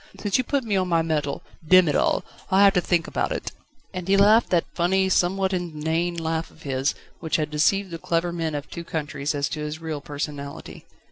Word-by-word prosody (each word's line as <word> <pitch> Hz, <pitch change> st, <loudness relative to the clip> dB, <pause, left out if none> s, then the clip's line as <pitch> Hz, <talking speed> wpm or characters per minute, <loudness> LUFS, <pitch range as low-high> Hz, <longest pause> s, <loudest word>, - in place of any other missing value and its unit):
since 205 Hz, -2 st, -1 dB
you -, -, +2 dB
put 275 Hz, +1 st, -1 dB
me 215 Hz, -3 st, -1 dB
on 185 Hz, -1 st, +1 dB
my 165 Hz, -2 st, +2 dB
mettle 150 Hz, -3 st, -2 dB, 0.2 s
Demm 185 Hz, +2 st, +6 dB
it 150 Hz, -, +1 dB
all! -, -, +1 dB, 0.2 s
I'll 190 Hz, 0 st, +4 dB
have 200 Hz, -1 st, +6 dB
to 180 Hz, -, +2 dB
think 170 Hz, -2 st, +1 dB
about -, -, -2 dB
it!" -, -, -3 dB, 0.4 s
And 180 Hz, -1 st, -5 dB
he 195 Hz, +1 st, +4 dB
laughed 210 Hz, +3 st, +5 dB
that 175 Hz, -2 st, +2 dB
funny, 190 Hz, +2 st, +2 dB
somewhat 190 Hz, +1 st, +1 dB
inane 170 Hz, 0 st, -1 dB
laugh 165 Hz, 0 st, -2 dB
of 160 Hz, -, -19 dB
his, 135 Hz, 0 st, -1 dB, 0.2 s
which 160 Hz, -2 st, -2 dB
had 155 Hz, -1 st, -1 dB
deceived 185 Hz, +5 st, +2 dB
the 165 Hz, -, -5 dB
clever 170 Hz, +1 st, 0 dB
men 165 Hz, -3 st, -2 dB
of 145 Hz, 0 st, -5 dB
two 170 Hz, -, -7 dB
countries 150 Hz, -2 st, -3 dB
as 140 Hz, 0 st, 0 dB
to 155 Hz, -, -4 dB
his 150 Hz, +1 st, -4 dB
real 160 Hz, -3 st, -5 dB
personality. 145 Hz, -1 st, -6 dB
165 Hz, 215 wpm, -24 LUFS, 150-185 Hz, 0.4 s, Demm